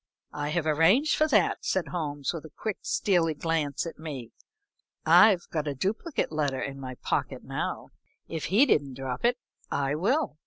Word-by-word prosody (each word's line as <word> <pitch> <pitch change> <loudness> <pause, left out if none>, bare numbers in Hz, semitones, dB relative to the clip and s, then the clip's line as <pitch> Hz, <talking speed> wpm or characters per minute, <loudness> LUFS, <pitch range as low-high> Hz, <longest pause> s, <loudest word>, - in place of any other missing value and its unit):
"I 145 0 -3
have 160 +1 -1
arranged 165 - +4
for 310 - +3
that," 300 - +2
said 190 -2 -1
Holmes, 145 -5 -3
with 165 - -6
a - - -10
quick, 215 -2 -3
steely 190 - +1
glance 155 -2 -1
at 165 - -7
me. 135 -8 -7 0.7
"I've 200 -5 +6
got 155 -2 -2
a 145 - -2
duplicate 220 - -2
letter 145 -4 -1
in 135 0 -5
my 130 -1 -6
pocket - - -2
now. - - -4 0.4
If 160 -2 -4
he 210 - +5
didn't 140 - +1
drop 130 -1 -5
it, 245 +1 +3 0.3
I 140 0 0
will." 215 - 0
160 Hz, 170 wpm, -27 LUFS, 145-200 Hz, 0.7 s, I've